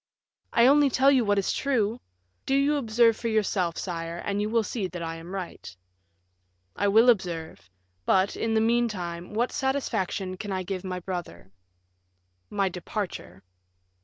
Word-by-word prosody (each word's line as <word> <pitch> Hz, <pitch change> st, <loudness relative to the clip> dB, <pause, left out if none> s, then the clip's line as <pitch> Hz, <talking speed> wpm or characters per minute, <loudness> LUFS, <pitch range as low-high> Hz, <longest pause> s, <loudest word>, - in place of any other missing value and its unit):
"I 235 Hz, -, +5 dB
only 285 Hz, +2 st, +6 dB
tell 270 Hz, +2 st, +4 dB
you 260 Hz, -3 st, +4 dB
what 205 Hz, -1 st, +2 dB
is 195 Hz, -, +1 dB
true. 235 Hz, -4 st, 0 dB, 0.5 s
Do 270 Hz, -, +2 dB
you 280 Hz, +2 st, +3 dB
observe 230 Hz, -3 st, +3 dB
for 230 Hz, -, -4 dB
yourself, 200 Hz, -6 st, 0 dB
sire, 165 Hz, -2 st, -4 dB
and 200 Hz, +3 st, -2 dB
you 210 Hz, -, -1 dB
will 230 Hz, 0 st, +2 dB
see 210 Hz, -2 st, -3 dB
that 175 Hz, -2 st, -6 dB
I 165 Hz, 0 st, -4 dB
am 165 Hz, +2 st, -10 dB
right." 170 Hz, -, -7 dB, 1.0 s
"I 205 Hz, -, +1 dB
will 220 Hz, +4 st, +5 dB
observe; 175 Hz, -, 0 dB, 0.4 s
but, 190 Hz, +1 st, +3 dB
in 225 Hz, 0 st, -1 dB
the 220 Hz, -, +4 dB
meantime, 210 Hz, -6 st, -1 dB
what 240 Hz, +3 st, +1 dB
satisfaction 220 Hz, -8 st, -2 dB
can 205 Hz, +2 st, -5 dB
I 185 Hz, -1 st, -2 dB
give 185 Hz, 0 st, -4 dB
my 185 Hz, -1 st, -4 dB
brother?" 170 Hz, -, -6 dB, 1.0 s
"My 200 Hz, -2 st, +1 dB
departure." 180 Hz, -, -5 dB
200 Hz, 160 wpm, -27 LUFS, 180-235 Hz, 1.0 s, only